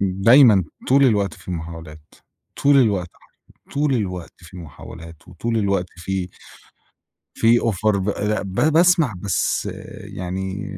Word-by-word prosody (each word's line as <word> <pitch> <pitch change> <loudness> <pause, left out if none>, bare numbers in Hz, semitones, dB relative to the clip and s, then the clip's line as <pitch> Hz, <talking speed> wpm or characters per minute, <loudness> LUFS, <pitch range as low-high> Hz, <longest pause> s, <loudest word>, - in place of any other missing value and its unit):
دايمًا 100 - +5 0.2
طول 140 +1 +5
الوقت 100 -7 +1
في - - -11
محاولات، 80 -2 -8 0.5
طول 140 0 +5
الوقت، 100 -9 +2 0.6
طول 145 -1 +1
الوقت 90 -6 -4
في 90 +1 -14
محاولات 80 0 -12
وطول 115 +6 -3
الوقت 100 -4 0
في 90 0 -4 1.1
في 115 +1 +4
offer 105 -1 0
ب 100 +1 -2
أ 105 +1 -1
ب 95 -2 -7 0.2
باسمع 165 - +4
بس 100 -2 -1 0.3
يعني، 95 +2 -5
100 Hz, 120 wpm, -21 LUFS, 90-115 Hz, 1.1 s, دايمًا